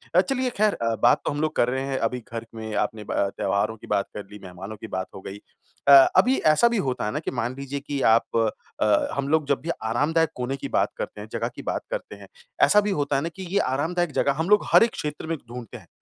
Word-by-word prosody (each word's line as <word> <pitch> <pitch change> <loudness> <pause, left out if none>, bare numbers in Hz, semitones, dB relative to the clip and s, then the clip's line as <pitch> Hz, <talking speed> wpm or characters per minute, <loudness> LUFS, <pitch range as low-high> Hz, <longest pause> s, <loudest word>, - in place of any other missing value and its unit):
अ, 180 - +8
चलिए 255 +4 -1
खैर 215 0 +3
अ, 115 -1 -1
बात 120 - +5
तो - - 0
हम 145 +1 -3
लोग 155 0 -1
कर 120 - +3
रहे 130 +1 -1
हैं 135 -1 -1
अभी 125 +2 -2
घर 115 0 -5
में 110 -1 -6
आपने 110 -1 -1
ब - - -7
अ, 100 - +1
त्योहारों 100 +2 0
की - - -13
बात 100 - +1
कर 105 - -6
ली, 105 - -10
मेहमानों 95 +3 -8
की 110 - -8
बात 95 -1 -3
हो 95 - -8
गई। 95 +1 -8 0.5
अ, - - +7 0.3
अभी 260 +2 +5 0.2
ऐसा 235 +10 +4
भी 235 - 0
होता 130 - -1
है 105 - -1
ना 150 - -2
कि - - -4
मान 120 0 -2
लीजिए 140 +1 -4
कि 140 0 -4
आप 115 -1 +4 0.6
अ, 105 -1 +3
हम 140 0 -2
लोग 155 -1 +2
जब 140 -2 +1
भी 165 - -6
आरामदायक 150 +8 +1
कोने 125 +2 -2
की - - -5
बात - - +1
करते - - -5
हैं, - - -8
जगह - - -2
की - - -7
बात - - -2
करते - - -5
हैं। - - -13 0.4
ऐसा 210 - +6
भी 205 0 -1
होता 140 0 0
है 135 - +2
ना 165 - -2
कि 190 - -7
ये - - +5
आरामदायक 160 +5 0
जगह 140 - +1
हम 165 +4 -1
लोग 210 0 +5
हर - - +8
एक 230 - +1
क्षेत्र 150 +1 -5
में 165 -1 -2
ढूँढते 120 -3 -9
हैं। - - -17
140 Hz, 270 wpm, -24 LUFS, 115-165 Hz, 0.6 s, अ